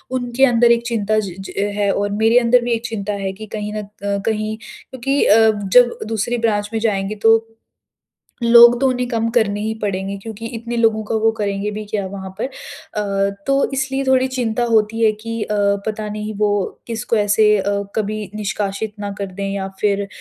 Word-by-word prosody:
उनके 245 +1 -1
अंदर 240 -2 +4
एक 235 0 +2
चिंता 215 -2 0
ज 195 -4 -4
ज 195 - -8 0.2
है। 205 -1 +1
और 205 +1 -1
मेरे 220 +3 +3
अंदर 245 +1 +4
भी 240 - -2
एक 230 0 -1
चिंता 210 -3 -3
है 195 -1 -2
कि 215 +3 -9
कहीं 210 0 -4
न - - -4
अ, 200 - -10 0.4
कहीं 215 -1 -1
क्योंकि 270 +2 -2
अ, 210 - +6 0.4
जब 245 -1 +6
दूसरी 225 +2 -1
ब्रांच 210 -3 0
में 225 - 0
जाएँगे 210 -2 -1
तो 225 0 +7 1.1
लोग 235 +1 +7
तो 270 - +3
उन्हें 250 -1 -1
कम 230 -2 0
करने 205 -3 +2
ही 220 +1 -2
पड़ेंगे 195 -1 -2
क्योंकि 225 +1 -7
इतने 235 +1 -5
लोगों 225 -2 +2
का 210 - -3
वो 225 - +5
करेंगे 200 0 -1
भी 210 +1 -6
क्या 205 -2 -3
वहाँ 190 0 -7
पर। - - 0
अ, 200 -6 -3 0.2
तो 275 0 +2
इसलिए 270 +1 -1
थोड़ी 260 0 +3
चिंता 245 -2 -1
होती 225 -1 +1
है 220 - +6
कि 230 +2 -6
अ, 210 - -2 0.3
पता 215 0 -3
नहीं 210 +1 -5
वो 210 -1 +2 0.4
किसको 230 0 -2
ऐसे 210 0 +4
अ, 200 +1 -1
कभी 215 0 -2
निष्कासित 205 0 -3
ना 205 -1 -3
कर 200 - -2
दें 195 +1 -4
या 195 -1 -3
फ़िर 200 -1 +1
215 Hz, 195 wpm, -19 LUFS, 205-235 Hz, 1.1 s, तो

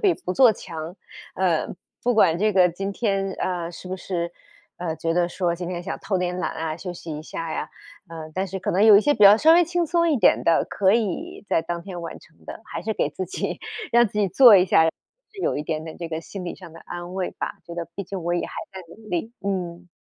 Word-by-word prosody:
比 395 -5 +4
不 180 - -5
做 250 +1 +6
强， 165 -1 -8 0.4
呃， 180 -4 +1 0.3
不 245 0 +2
管 170 -7 +4
这 215 +2 +2
个 185 -2 +5
今 195 +3 -4
天， 195 -3 -1
呃， 175 -2 -2
是 180 - -11
不 185 +1 -4
是， 170 -2 -3 0.5
呃， 165 -2 -3
觉 165 0 -1
得 175 0 +2
说 175 -1 -1
今 175 0 -5
天 175 -1 -4
想 - - -4
偷 195 -3 -1
点 180 0 -2
懒 - - -1
啊， 160 -1 -3
休 180 +1 -6
息 165 -3 -7
一 150 - -7
下 165 0 -5
呀， - - -3 0.4
呃， 160 -1 -8
但 190 +1 -1
是 190 +1 -5
可 - - -2
能 195 +3 +2
有 215 -2 +9
一 - - +7
些 290 +6 +3
比 210 - 0
较 200 +1 +10
稍 320 +6 +6
微 345 +1 +6
轻 345 0 -1
松 340 0 +2
一 295 - +3
点 230 - +4
的， 165 -1 +3
可 195 -1 +2
以 235 - -2
在 165 - +2
当 170 +1 -4
天 185 -2 -7
完 170 - -7
成 - - -23
的， - - -8
还 - - -6
是 220 - -1
给 - - 0
自 185 - -4
己， 180 - -4 0.3
让 240 0 +6
自 - - -26
己 205 - +3
做 235 +2 +8
一 180 - +5
下， 160 - +5
是 435 - -8
有 - - 0
一 150 - -2
点 155 0 -3
点 160 - -8
这 170 -1 -5
个 160 0 -4
心 185 +1 -8
理 175 - -4
上 175 -4 -13
的 165 - -13
安 175 +1 -8
慰 190 -1 -2
吧， - - -5
觉 170 - -9
得 170 -1 -4
毕 200 - -5
竟 185 -1 -6
我 175 +1 0
也 175 - -1
还 - - -11 0.2
在 190 - -7
努 215 +4 -14
力， 180 +7 -3
嗯。 180 -2 -3
180 Hz, 275 characters per minute, -24 LUFS, 170-210 Hz, 0.5 s, 较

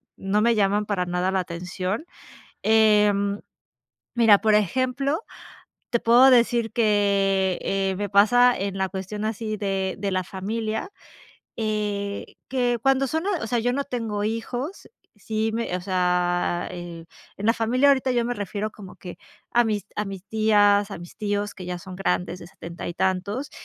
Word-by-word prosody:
no 195 +2 0
me 235 +2 +4
llaman 205 0 +2
para 200 -3 -1
nada 180 +1 0
la 190 - +1
atención. 185 - -4 0.6
Em, 210 -2 +3 0.7
mira, 225 -4 +6
por 215 0 +2
ejemplo, 255 - +1 0.7
te 235 - +2
puedo 240 +4 +6
decir 235 -2 +3
que, 200 -4 +2
eh 195 0 0
eh, - - -3
me 205 0 -3
pasa 245 +5 +5
en 195 0 -3
la 190 0 -1
cuestión 195 +2 -5
así 220 0 -3
de 195 -2 -2
de 200 0 -2
la 185 0 0
familia, 215 - -4 0.7
eh, 210 -2 -2 0.2
que 245 -2 0
cuando 270 +1 +3
son, 320 +6 -2 0.2
o - - -3
sea, 240 +1 0
yo 245 +2 0
no 280 +2 -1
tengo 225 -6 -3
hijos. 245 - -4 0.3
Sí, 220 +1 -2
me 230 -5 -2
o - - -8
sea, 180 -1 0
eh, 175 -2 -8 0.3
en 205 - -4
la 230 - +4
familia 250 +5 +2
ahorita 265 -1 +3
yo 240 -1 +1
me 245 - -1
refiero 205 0 -4
como 195 -4 -12
que 180 - -10 0.3
a 240 - +4
mis 210 -3 -2
a 210 - -1
mis 195 -2 -7
tías, 205 -2 +3
a 200 - -6
mis 175 +1 -11
tíos 205 -1 -2
que 185 - -9
ya 180 0 -4
son 185 +1 -10
grandes 180 -2 -1
de 170 - -11
70, 170 -2 -8
y 175 - -5
tantos 200 +10 -1
205 Hz, 170 wpm, -24 LUFS, 190-230 Hz, 0.7 s, mira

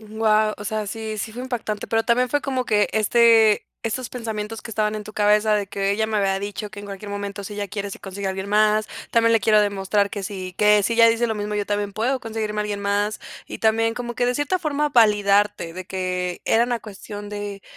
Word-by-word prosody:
Guau, 215 0 +1
o 205 - -9
sea, 215 0 -2
sí 220 0 -5
sí 220 +1 -4
fue 245 +2 -6
impactante, 225 -5 -4
pero 225 0 +1
también 250 +1 +2
fue 290 +3 +1
como 260 -2 -2
que 210 -3 +2
este 220 0 +4 0.2
esos 240 +2 -3
pensamientos 225 -2 -5
que 225 - -8
estaban 215 0 0
en 210 - -6
tu 215 - -10
cabeza 210 +1 +3
de 205 -1 0
que: 195 0 -1
"Ella 220 +2 +1
me 220 -1 -2
había 195 -1 +1
dicho 205 +1 -5
que 205 0 -10
en - - -9
cualquier 200 +1 -8
momento 200 0 -5
si 205 - -7
ella 205 -1 -4
quiere 200 -1 -4
se - - -9
consigue 195 0 -6
a - - +1
alguien 190 +1 -5
más. 215 +1 +3 0.2
También 230 0 +4
le 225 - +4
quiero 215 0 +4
demostrar 200 0 +1
que 200 - -5
si 185 -2 -6
que 210 0 +4
si 230 - 0
ella 230 0 +7
dice 230 +1 +2
lo 220 - -1
mismo, 210 0 -3
yo 205 -1 -1
también 205 -1 -2
puedo 245 +6 0
conseguirme 220 -2 -3
a - - +1
alguien 205 -1 -3
más". 205 +1 0 0.3
Y - - -7
también 225 +1 +2
como 240 -1 -5
que 245 - 0
de 250 - +1
cierta 290 +7 0
forma 300 -2 0
validarte 205 -6 +3
de 185 +1 -7
que 180 -1 -3
era 230 +1 +3
una 240 -1 -2
cuestión 205 0 -9
de 205 -1 -6
210 Hz, 240 wpm, -22 LUFS, 205-225 Hz, 0.3 s, ella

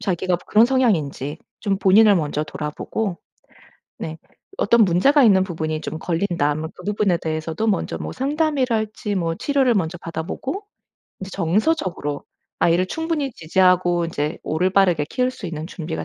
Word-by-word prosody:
자기가 185 -2 0
그런 220 +2 +5
성향인지 165 - 0 0.2
좀 200 -3 0
본인을 205 +2 +6
먼저 150 -2 -1
돌아보고 155 +6 -4 0.8
네 160 0 -6 0.4
어떤 230 +2 +4
문제가 265 - +4
있는 195 -5 +5
부분이 160 -4 -3
좀 160 - -5
걸린다 170 -3 0
하면 155 +2 -3
그 180 - -12
부분에 205 -3 +1
대해서도 160 +5 -3
먼저 205 - 0
뭐 - - -5
상담이랄지 255 -8 -1
뭐 165 -3 -1
치료를 270 - +2
먼저 175 -3 -1
받아보고 170 - -5 0.6
이제 190 0 -7
정서적으로 185 - -1 0.3
아이를 175 +2 +3
충분히 320 - -2
지지하고 175 0 +2
이제 150 -1 -3
올바르게 180 -1 +2
키울 255 0 +1
수 255 -6 -8
있는 160 -2 -5
준비가 160 -2 -5
185 Hz, 350 characters per minute, -22 LUFS, 160-220 Hz, 0.8 s, 본인을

